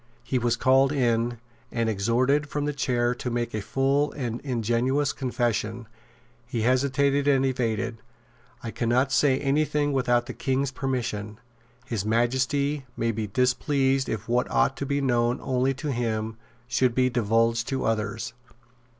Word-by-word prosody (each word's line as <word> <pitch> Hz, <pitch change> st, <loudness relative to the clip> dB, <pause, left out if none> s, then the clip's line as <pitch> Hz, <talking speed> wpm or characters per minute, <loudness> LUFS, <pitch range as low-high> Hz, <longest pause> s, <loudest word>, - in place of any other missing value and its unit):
He 125 Hz, +1 st, -1 dB
was 120 Hz, -1 st, +1 dB
called 135 Hz, +1 st, +4 dB
in, 120 Hz, -3 st, +1 dB, 0.3 s
and 115 Hz, -1 st, 0 dB
exhorted 125 Hz, +8 st, +1 dB
from 145 Hz, 0 st, -2 dB
the 150 Hz, -, -1 dB
chair 120 Hz, -3 st, 0 dB
to 125 Hz, 0 st, -4 dB
make 120 Hz, 0 st, -2 dB
a 110 Hz, -, -2 dB
full 135 Hz, +6 st, +1 dB
and 120 Hz, -4 st, -4 dB
ingenuous 125 Hz, +3 st, 0 dB
confession. 120 Hz, -3 st, -2 dB, 0.6 s
He 120 Hz, -2 st, -2 dB
hesitated 140 Hz, +3 st, +2 dB
and 135 Hz, -2 st, +4 dB
evaded. 115 Hz, -3 st, -1 dB, 0.6 s
"I 115 Hz, -, -4 dB
cannot 125 Hz, +4 st, +1 dB
say 135 Hz, -1 st, +3 dB
any 140 Hz, +2 st, +2 dB
thing 145 Hz, -1 st, 0 dB
without 120 Hz, -2 st, +2 dB
the -, -, -6 dB
King's 135 Hz, 0 st, -1 dB
permission. 120 Hz, -5 st, -3 dB, 0.5 s
His 110 Hz, -5 st, -2 dB
Majesty 130 Hz, +5 st, 0 dB
may 115 Hz, 0 st, +1 dB
be 110 Hz, -1 st, -3 dB
displeased 130 Hz, +4 st, +1 dB
if 110 Hz, -, -4 dB
what 120 Hz, +1 st, +1 dB
ought 135 Hz, -, +2 dB
to 140 Hz, -, -3 dB
be 140 Hz, 0 st, 0 dB
known 120 Hz, -2 st, +1 dB
only 130 Hz, 0 st, 0 dB
to 145 Hz, +2 st, -3 dB
him 110 Hz, -3 st, -2 dB, 0.3 s
should 125 Hz, 0 st, +1 dB
be 130 Hz, 0 st, +2 dB
divulged 115 Hz, 0 st, +1 dB
to 135 Hz, -1 st, -2 dB
others." 110 Hz, +1 st, -2 dB
125 Hz, 150 wpm, -26 LUFS, 115-135 Hz, 0.6 s, called